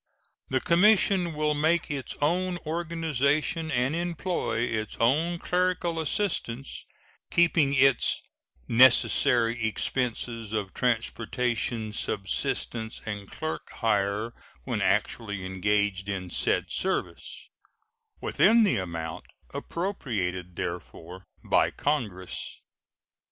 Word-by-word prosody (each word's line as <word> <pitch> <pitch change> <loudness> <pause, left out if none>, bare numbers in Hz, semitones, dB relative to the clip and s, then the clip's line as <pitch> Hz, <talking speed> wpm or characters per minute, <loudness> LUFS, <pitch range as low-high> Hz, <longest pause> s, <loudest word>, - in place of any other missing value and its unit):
The 130 - +1
commission 180 0 +4
will 150 0 +1
make 160 +3 +1
its 135 -5 -4
own 180 +3 +1
organization 160 -1 0
and 125 +4 +1
employ 175 -6 -1
its 110 -3 -2
own 155 +9 +2
clerical 180 -1 0
assistants, 140 - -2 0.4
keeping 165 -5 +3
its 135 -2 +4 0.5
"necessary 120 -1 +4
expenses 115 0 -2
of 105 -3 -2
transportation, 115 -1 -1
subsistence, 110 +3 -2
and 100 -2 -5
clerk 155 0 -5
hire 105 0 0 0.3
when - - -2
actually 105 -5 0
engaged 100 +1 0
in 95 -3 -4
said - - +1
service" - - -3 0.7
within 225 +3 +4
the 205 - +3
amount 80 -3 -5 0.3
appropriated 95 - -3
therefor 90 0 -6 0.2
by - - +3
Congress. 105 -11 -3
125 Hz, 95 wpm, -27 LUFS, 105-165 Hz, 0.7 s, commission